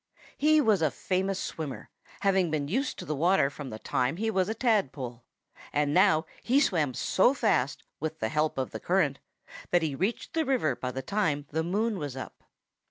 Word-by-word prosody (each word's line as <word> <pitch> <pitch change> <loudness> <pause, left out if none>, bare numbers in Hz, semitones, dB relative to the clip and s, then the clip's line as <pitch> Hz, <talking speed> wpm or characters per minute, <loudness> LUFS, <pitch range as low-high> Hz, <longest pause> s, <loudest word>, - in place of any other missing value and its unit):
He 310 +1 +4
was 215 - +3
a 155 - +3
famous 190 +1 -1
swimmer, 155 -7 -5 0.3
having 190 -3 +3
been 150 -2 -1
used 260 - -1
to - - -7
the 155 - -2
water 165 -1 +3
from 140 -1 -7
the 110 - -6
time 125 +6 -1
he 220 +2 0
was 190 -1 +1
a 220 - -2
tadpole. 140 - 0 0.5
And 145 0 +1
now 180 -3 +4 0.2
he 260 +4 +3
swam 155 - +1
so 245 +8 +3
fast, 140 - +1 0.2
with 160 +1 -3
the 110 - -2
help 150 +3 0
of 130 -1 -2
the - - -5
current, - - +1 0.5
that 175 -1 +3
he 155 -3 -1
reached 190 - -2
the 325 - +1
river 260 - +1
by 125 - -4
the 130 +1 -5
time 155 -6 0
the 160 +2 0
moon 205 +5 0
was 145 -4 -5
up. 130 - -8
165 Hz, 195 wpm, -28 LUFS, 145-205 Hz, 0.5 s, He